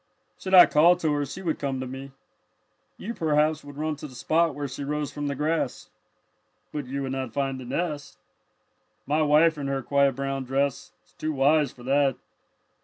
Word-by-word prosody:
"Should 190 0 +1
I 180 - +11
call 170 +4 +5
to 160 -4 -1
her 145 -1 -1
she 190 +8 -8
would 160 -3 -1
come 135 -2 -2
to 130 - -4
me. 135 +2 -7 0.9
You 230 +4 -5
perhaps 155 -3 +1
would 145 0 -11
run 155 0 -2
to 150 - -7
the 130 - -14
spot 160 +3 +1
where 145 0 -3
she 140 - -6
rose 150 0 -3
from 145 0 -4
the 140 - -2
grass. 155 +4 -2 0.8
But 145 -4 -4
you 140 +2 -3
would 135 - -3
not 130 -3 -4
find 135 -2 -2
the 130 - -8
nest. 145 0 -4 0.9
"My 150 +2 +1
wife 155 +1 +4
in 140 - -3
her 135 -1 -2
quiet 140 -1 +2
brown 135 0 -3
dress 135 +1 -1
is - - -31
too 155 0 -3
wise 145 0 +3
for 125 - -15
that. 135 0 +2
145 Hz, 195 wpm, -26 LUFS, 135-155 Hz, 0.9 s, I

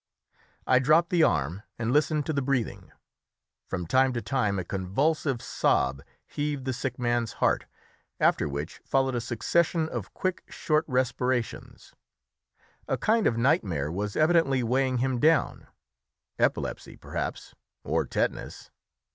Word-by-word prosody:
I 130 - +4
dropped 155 +6 +3
the 175 -2 +3
arm 85 - +1 0.2
and 115 0 -1
listened 150 +1 +2
to 160 - -2
the 140 - 0
breathing. 130 -3 -2 0.8
From 90 -3 -3
time 130 +7 +3
to 120 - -2
time 105 -8 0
a 95 - -2
convulsive 120 - -1
sob 65 +1 +1 0.2
heaved 145 -2 -3
the 130 - -1
sick 125 +1 -4
man's 120 -2 0
heart, - - +1 0.5
after - - +2
which 70 +3 -5
followed 135 -1 +1
a 120 - -1
succession 160 +8 +1
of 120 -9 -5
quick, 185 -1 -2
short 155 -2 0
respirations. 125 -2 -2 0.9
A - - 0
kind 225 0 +2
of 115 - 0
nightmare 90 - +1
was 100 +3 -3
evidently 155 -5 +3
weighing 130 +2 +1
him 130 0 0
down 160 +3 +2 0.7
epilepsy, - - -1
perhaps, - - -5 0.3
or - - 0
tetanus. - - -3
130 Hz, 135 wpm, -27 LUFS, 115-150 Hz, 0.9 s, I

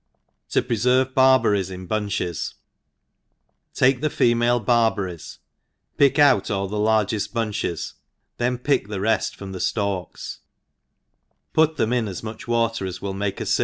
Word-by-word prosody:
1^0 - - +1
preferve 125 +2 +2
Barberries 130 -8 +4
in 95 0 -8
Bunches. 100 -5 -2 1.2
TAKE 130 0 +3
the 155 - +1
female 120 -1 +2
barberries, 100 -7 0 0.6
pick 140 -2 +3
out 140 -9 +4
all 100 -1 -1
the 105 +2 -4
largeft 110 -1 +1
bunches, 105 -8 -2 0.4
then 125 +1 0
pick 125 -4 0
the 105 -2 -4
reft 110 +3 0
from 100 -1 -8
the 95 - -6
ftalks, 100 -4 -3 1.1
put 160 0 +3
them 110 +2 +1
in 120 -3 0
as 95 0 -6
much 110 +1 -8
water 115 -4 0
as 95 0 -6
will 100 0 -4
make 100 0 -3
4 - - -4
fy. - - -2
110 Hz, 145 wpm, -23 LUFS, 100-125 Hz, 1.2 s, Barberries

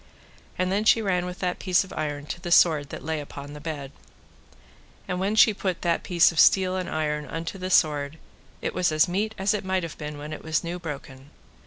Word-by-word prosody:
And 185 0 0
then 205 +2 +1
she 220 - +5
ran 180 -4 0
with 180 0 -6
that 180 -1 -1
piece 185 -1 +2
of 190 - -11
iron 145 -2 -3
to 175 - -6
the 175 -1 -5
sword 155 -5 +5
that - - -8
lay 160 -1 -1
upon 145 0 -8
the 150 - -9
bed. 145 -4 -5 1.2
And 180 - -2
when 200 +3 0
she 220 0 +6
put 190 -3 -3
that 170 -1 +1
piece 175 -2 +4
of 165 - -3
steel 185 -1 +5
and 185 -1 -3
iron 150 -1 -2
unto 165 +4 -5
the 185 0 -4
sword, 150 -3 +2 0.5
it - - -2
was 180 -3 +1
as 155 +4 +3
meet 210 +5 -1
as 195 +2 +1
it 210 - -2
might 190 0 0 0.2
be 150 - -4
when 150 +1 -7
it - - -8
was 160 -1 0
new 170 +1 -4
broken. 140 -4 -8
170 Hz, 220 wpm, -25 LUFS, 150-185 Hz, 1.2 s, she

